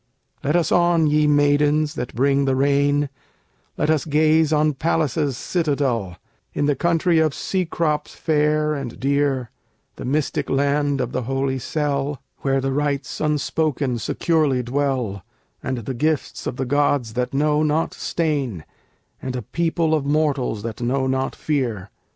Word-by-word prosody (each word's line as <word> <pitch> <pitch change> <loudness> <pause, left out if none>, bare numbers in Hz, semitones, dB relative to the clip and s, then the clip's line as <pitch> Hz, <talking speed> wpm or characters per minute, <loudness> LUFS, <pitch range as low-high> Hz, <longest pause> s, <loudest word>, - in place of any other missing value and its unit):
Let 150 +4 +1
us 175 -2 +2
on, 175 -2 +4
ye 150 0 +3
Maidens 145 +1 +3
that 125 -5 -5
bring 140 +2 +2
the 135 -1 +1
Rain, 140 +1 +2 0.7
Let 155 - +2
us 155 -4 +1
gaze 155 +1 +3
on 155 0 +3
Pallas's 150 -2 0
citadel, 135 - -1 0.4
In 145 - +1
the 145 -1 +2
country 170 +2 +2
of 155 -3 +2
Cecrops 165 -5 -1
fair 150 0 +1
and 135 -5 -5
dear, 140 -2 0 0.5
The - - -6
mystic 145 +3 -1
land 140 0 +1
of 125 -1 -2
the 130 - -2
holy 135 +1 -1
cell, 145 -1 -2 0.2
Where 135 -1 +1
the 135 0 -1
Rites 140 -1 -2
unspoken 150 -3 0
securely 145 +1 +1
dwell, 125 -7 -1 0.4
And 130 - -3
the 120 +3 -4
gifts 150 +4 -1
of - - -3
the 130 - -2
gods 140 -3 +1
that 125 +1 -1
know 150 +2 +2
not 155 +1 +1
stain, 140 - -2 0.6
And 130 -1 -4
a 125 - -4
people 165 +4 0
of 155 -3 +1
mortals 140 -7 0
that 115 0 -5
know 130 +3 0
not 130 0 -1
fear. 120 -10 -2
145 Hz, 150 wpm, -22 LUFS, 130-155 Hz, 0.7 s, on